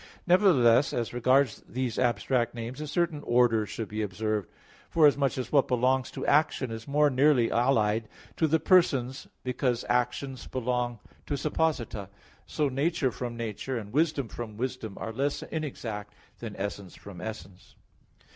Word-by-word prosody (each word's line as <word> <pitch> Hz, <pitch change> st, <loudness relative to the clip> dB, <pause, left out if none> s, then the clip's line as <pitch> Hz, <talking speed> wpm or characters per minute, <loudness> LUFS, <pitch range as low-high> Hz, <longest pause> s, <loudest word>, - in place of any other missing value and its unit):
Nevertheless, 145 Hz, -, +5 dB
as 120 Hz, -2 st, -2 dB
regards 130 Hz, 0 st, +2 dB
these 125 Hz, -2 st, -2 dB
abstract 120 Hz, 0 st, +1 dB
names 120 Hz, +5 st, -6 dB
a 150 Hz, -, -4 dB
certain 165 Hz, -1 st, 0 dB
order 120 Hz, -4 st, +3 dB
should 115 Hz, -, -5 dB
be 105 Hz, +2 st, -4 dB
observed, 105 Hz, 0 st, -2 dB, 0.4 s
forasmuch 145 Hz, -4 st, +3 dB
as 125 Hz, -2 st, -4 dB
what 140 Hz, -3 st, +4 dB
belongs 130 Hz, +1 st, +1 dB
to -, -, -6 dB
action 140 Hz, -4 st, +2 dB
is 115 Hz, 0 st, -7 dB
more 145 Hz, +1 st, +3 dB
nearly 130 Hz, -2 st, +3 dB
allied 115 Hz, -3 st, +2 dB, 0.3 s
to 160 Hz, -, +3 dB
the 160 Hz, +2 st, +2 dB
persons 140 Hz, -7 st, +2 dB, 0.2 s
because 125 Hz, -1 st, -1 dB
actions 125 Hz, +2 st, -1 dB
belong 125 Hz, -1 st, -1 dB, 0.3 s
to 145 Hz, -, -1 dB
supposita. 140 Hz, -9 st, -1 dB, 0.4 s
So 150 Hz, -2 st, 0 dB
"nature 140 Hz, 0 st, 0 dB
from 120 Hz, -1 st, -5 dB
nature," 115 Hz, +3 st, -4 dB
and 105 Hz, -1 st, -7 dB
"wisdom 150 Hz, -3 st, +1 dB
from 110 Hz, -2 st, -7 dB
wisdom" 120 Hz, -4 st, -4 dB
are 110 Hz, -, -5 dB
less 140 Hz, +4 st, -1 dB
inexact 115 Hz, -9 st, -5 dB, 0.2 s
than 115 Hz, -3 st, -7 dB
"essence 100 Hz, -1 st, -5 dB
from 95 Hz, -4 st, -11 dB
essence." 95 Hz, -3 st, -9 dB
125 Hz, 145 wpm, -28 LUFS, 115-140 Hz, 0.4 s, Nevertheless